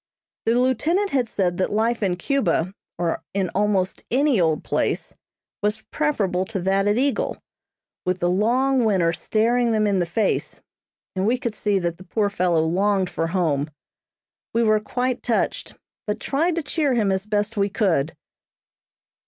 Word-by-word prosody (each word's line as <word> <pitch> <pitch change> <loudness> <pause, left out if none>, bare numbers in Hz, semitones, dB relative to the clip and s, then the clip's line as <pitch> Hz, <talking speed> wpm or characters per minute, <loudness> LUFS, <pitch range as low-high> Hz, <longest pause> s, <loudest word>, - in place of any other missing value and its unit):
The 230 - +4
lieutenant 315 +11 +1
had 255 -4 +1
said 180 -4 0
that 185 - 0
life 225 +3 +1
in 190 -3 +1
Cuba, 190 - 0 0.2
or 170 -1 -1
in 190 -3 0
almost 195 -1 0
any 265 -4 +3
old 160 -2 +1
place - - -1 0.5
was 210 +1 -1
preferable 205 -12 0
to 195 0 -4
that 195 +2 +1
at 205 +2 +2
Eagle, 280 - 0 0.7
with 180 0 0
the 175 - 0
long 245 +8 +2
winter 185 -6 +2
staring 230 +7 +1
them 215 -1 +2
in 200 -2 +2
the 175 - 0
face, 200 +4 -1 0.6
and 190 +2 0
we 245 +3 +3
could 235 -3 -3
see 205 -2 0
that 170 -2 -2
the 185 - -12
poor 205 +2 0
fellow 175 -4 +2
longed 190 +3 +1
for 165 - -1
home. 160 -5 0 0.9
We 235 - +3
were 215 -1 +4
quite 250 +4 -2
touched, 235 -2 -1 0.3
but 210 +1 -1
tried 320 +8 0
to 335 - -2
cheer 290 -3 0
him 210 -4 +2
as 190 +2 -1
best 210 +1 0
we 200 -1 +1
could. 180 -8 0
210 Hz, 165 wpm, -23 LUFS, 185-240 Hz, 0.9 s, The